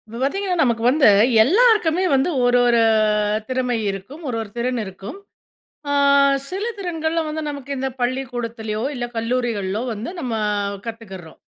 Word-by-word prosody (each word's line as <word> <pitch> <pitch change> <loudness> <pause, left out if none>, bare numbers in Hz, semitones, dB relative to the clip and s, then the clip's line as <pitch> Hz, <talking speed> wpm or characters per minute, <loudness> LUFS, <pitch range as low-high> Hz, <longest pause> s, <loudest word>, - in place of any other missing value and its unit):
இப்ப 230 +2 -8
பாத்தீங்கன்னா 365 +6 -1
நமக்கு 235 -3 0
வந்து 290 0 +4 0.4
எல்லாருக்குமே 380 - +3
வந்து 270 +5 +2
ஒரு 245 0 +4
ஒரு 235 -1 +3 0.7
திறமை 255 -1 -1
இருக்கும். 200 - -7
ஒரு 235 - -2
ஒரு 220 - -7
திறன் 245 +1 -1
இருக்கும். 195 - -9 0.7
ஆ - - 0 0.6
சில 385 +4 -3
திறன்கள்ல 330 -4 -2
வந்து 310 +1 -4
நமக்கு 280 -2 -8
இந்த 265 +1 -2
பள்ளிக்கூடத்திலயோ! 240 -4 -3
இல்ல 240 -1 -3
கல்லூரிகள்லோ! 225 -4 -1
வந்து 215 +6 -6
நம்ம 250 -7 -3 0.5
கத்துக்கிறோம். 195 -8 -9
250 Hz, 135 wpm, -21 LUFS, 225-310 Hz, 0.7 s, வந்து